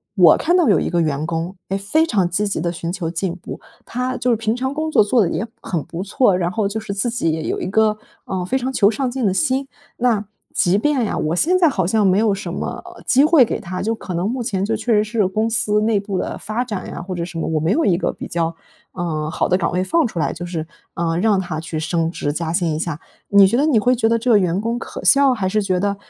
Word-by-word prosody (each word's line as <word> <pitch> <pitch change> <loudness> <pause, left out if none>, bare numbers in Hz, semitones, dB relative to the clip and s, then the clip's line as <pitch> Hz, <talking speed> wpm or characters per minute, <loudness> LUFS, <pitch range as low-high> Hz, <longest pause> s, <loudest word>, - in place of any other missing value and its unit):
我 175 -6 +7
看 350 +3 +2
到 345 -5 +3
有 200 - +4
一 - - -2
个 175 - 0
员 150 -2 -1
工 170 +3 -3
诶 195 - 0
非 210 +12 +1
常 200 - +1
积 205 +4 0
极 200 - -2
地 170 +1 -1
寻 170 0 -4
求 180 -2 -3
进 170 +1 -2
步， 180 - -9 0.3
他 250 +1 -3
就 250 0 +1
是 - - +4
平 225 0 -1
常 260 +2 -2
工 310 +1 -2
作 215 - +5
做 225 +4 +2
得 175 - 0
也 200 - -2 0.2
很 165 -5 -3
不 170 - -6
错， 200 0 +2
然 175 -1 0
后 215 0 0
就 210 +2 -3
是 215 -2 -6
自 200 +5 -1
己 160 -8 -1
有 - - -2
一 - - -3
个 215 +2 +2 0.3
呃 185 -1 -3
非 260 +9 0
常 260 0 -3
求 205 -5 +4
上 255 +3 -1
进 255 -2 -2
的 190 - +1
心， 270 +4 0 0.3
那 230 -4 +1 0.3
即 175 +2 +3
便 275 -1 +1
呀， - - -2
我 155 +2 -1
现 350 - +3
在 340 -3 +5
好 190 -10 -1
像 210 +3 +2
没 185 0 +3
有 215 -1 +3
什 195 -3 -5
么 185 - -5 0.2
机 270 +2 +4
会 305 -4 +6
给 - - -3
他， 185 -2 -5
就 225 +2 0
可 185 -5 -6
能 175 +3 -1
目 250 +2 -3
前 195 -4 -1
就 225 +2 0
确 245 - -2
实 210 -1 +4
是 215 -2 0
公 215 +4 0
司 210 -2 +2
内 215 -1 +2
部 200 -1 -4
的 - - -3
发 220 +4 -3
展 210 -6 -5
呀， - - -6
或 185 +2 -6
者 170 - -3
什 170 -1 -7
么， - - -2
我 160 -1 0
没 160 +4 0
有 320 +8 +2
一 185 - +3
个 175 - -1
比 - - -8
较 165 -1 -2 0.4
呃 155 -4 -3
好 160 - 0
的 180 - +2
岗 185 - 0
位 180 +1 0
放 320 - +2
出 215 - -9
来， 165 - 0
就 175 +2 -6
是 165 -3 -4 0.3
呃 165 -1 -1
让 205 0 +3
他 175 -4 -4
去 160 0 -5
升 165 +1 0
职 145 -3 -3
加 160 +1 -3
薪 170 -1 0
一 155 - -2
下。 160 -2 -3 0.3
你 200 -1 +7
觉 200 - 0
得 285 +5 +2
你 285 -7 +3
会 250 +4 +3
觉 225 -2 +1
得 230 - +3
这 240 +2 0
个 215 - +6
员 180 -1 0
工 230 +3 -2
可 - - -8
笑， 275 -1 +6
还 205 -6 -1
是 210 +3 +1
觉 185 -2 0
得 200 +1 0
200 Hz, 300 characters per minute, -20 LUFS, 175-230 Hz, 0.4 s, 我